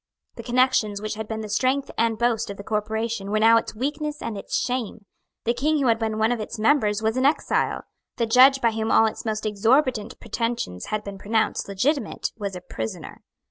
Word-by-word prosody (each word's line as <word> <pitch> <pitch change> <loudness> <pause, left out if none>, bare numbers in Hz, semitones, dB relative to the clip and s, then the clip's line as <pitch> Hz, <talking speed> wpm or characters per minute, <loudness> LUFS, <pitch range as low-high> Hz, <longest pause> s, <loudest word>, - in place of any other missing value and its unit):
The - - -8
connections 240 -4 +2
which 215 +1 -4
had 220 0 -6
been 220 0 -4
the 215 - -5
strength 260 +6 0
and 225 -1 +1
boast 230 -1 0
of 200 - -6
the 200 - -8
corporation 220 0 -2
were 215 - +1
now 225 +1 +6
its 225 - -3
weakness 295 +5 -3
and 225 - -4
its 200 - -3
shame. 235 -4 -3 0.4
The 235 - +1
King 300 +5 +1
who 265 -3 +2
had 225 -1 +2
been 220 -1 -2
one 220 +2 +2
of 240 - -1
its 220 +2 -5
members 220 -3 +2
was 220 +3 0
an 260 - +2
exile. 295 - 0 0.3
The 235 - +1
judge 260 +4 +6
by 230 - +3
whom 220 0 -2
all 225 - +6
its 220 - -3
most 215 -1 -2
exorbitant 225 +2 +1
pretensions 230 - -3
had 215 0 -2
been 200 -1 -8
pronounced 220 +2 0
legitimate 225 +5 -1
was 200 -3 -5
a 180 - -7
prisoner. 110 -10 -7
225 Hz, 210 wpm, -24 LUFS, 215-245 Hz, 0.4 s, now